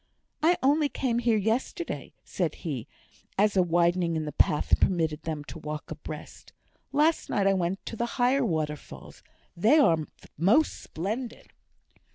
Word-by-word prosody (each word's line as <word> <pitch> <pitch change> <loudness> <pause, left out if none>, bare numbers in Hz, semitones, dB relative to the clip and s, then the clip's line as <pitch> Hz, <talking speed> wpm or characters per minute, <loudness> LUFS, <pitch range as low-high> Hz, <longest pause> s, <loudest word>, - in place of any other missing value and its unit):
"I 340 +3 +4
only 290 +2 +3
came 240 -4 -1
here 235 -2 +2
yesterday," 230 - -2
said - - -2
he, - - -3 0.5
as 205 +1 +3
a 190 - +5
widening 175 0 +2
in 155 -1 -2
the 150 - -4
path 150 - +2
permitted 160 -4 +1
them 155 -2 -4
to 165 - -9
walk 150 0 -6
abreast. - - -9 0.4
"Last 310 +3 +2
night 200 - +1
I 195 - +4
went 185 +1 -2
to - - -5
the 235 +2 -1
higher 260 +2 +3
waterfalls; 155 - -4 0.3
they 220 - +4
are 170 - +5 0.4
most 215 - +3
splendid." 220 +9 -5
195 Hz, 150 wpm, -27 LUFS, 165-250 Hz, 0.5 s, a